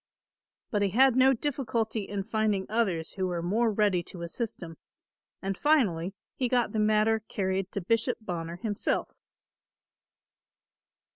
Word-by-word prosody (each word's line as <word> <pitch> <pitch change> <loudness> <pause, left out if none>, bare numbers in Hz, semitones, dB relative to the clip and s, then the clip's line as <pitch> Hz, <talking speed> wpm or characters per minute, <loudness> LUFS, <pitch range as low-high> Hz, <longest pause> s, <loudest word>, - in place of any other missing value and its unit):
But 205 - +1
he 200 - +2
had 260 +5 +5
no 260 +1 +6
difficulty 230 -5 -1
in 200 -1 -2
finding 215 -2 0
others 195 -8 0
who 190 -2 -2
were 175 -2 -2
more 220 +6 +2
ready 205 -4 +2
to 175 -2 -7
assist 205 +4 -4
him, 165 -2 -9 0.7
and 195 0 -1
finally 195 - +2 0.2
he 255 - 0
got 245 -1 +2
the 220 - -1
matter 215 +1 +3
carried 190 -3 -2
to 200 - -2
Bishop 225 +5 +1
Bonner 170 -5 -5
himself. 205 +3 -1
210 Hz, 140 wpm, -28 LUFS, 185-230 Hz, 0.7 s, no